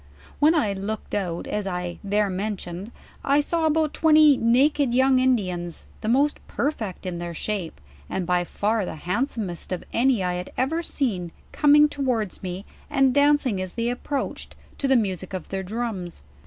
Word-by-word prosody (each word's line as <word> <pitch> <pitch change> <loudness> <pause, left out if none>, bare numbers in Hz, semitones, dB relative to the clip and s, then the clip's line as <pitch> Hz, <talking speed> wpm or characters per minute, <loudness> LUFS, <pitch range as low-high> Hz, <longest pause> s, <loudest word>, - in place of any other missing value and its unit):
When 310 +3 +5
I 215 -10 +2
looked 200 +2 -5
out, 180 -5 -2
as 210 -1 -3
I 180 -1 -4
there 205 +1 +1
mention 185 -2 -4
ed, - - -13 0.3
I 280 +1 +3
saw 320 +2 +1
about 310 -1 +1
twenty 310 -2 +6
naked 255 +2 +3
young 260 0 +4
Indians, 185 -10 0 0.2
the - - -4
most 280 +5 +2
per 280 +5 0
fect 210 - -7
in 175 -2 -3
their 170 -1 -5
shape, 195 -3 -3 0.3
and 185 - -2
by 180 0 +2
far 210 +4 0
the 180 - -5
handsomest 185 - -3
of 185 - -3
any 245 -4 +3
I 180 0 0
had 180 +1 -5
ever 305 +6 0
seen, 210 - -2 0.2
coming 295 0 +6
towards 250 -9 -2
rne, 185 +1 -5 0.2
and 270 -3 +3
dancing 285 -7 +3
as 185 -1 -6
they 235 +1 0
approach 270 +3 -3
ed, - - -18 0.2
to 275 - +1
the 265 - +4
music 190 -5 -1
of 185 - -6
their 195 0 -2
drums. 190 - -4
220 Hz, 180 wpm, -24 LUFS, 185-275 Hz, 0.3 s, twenty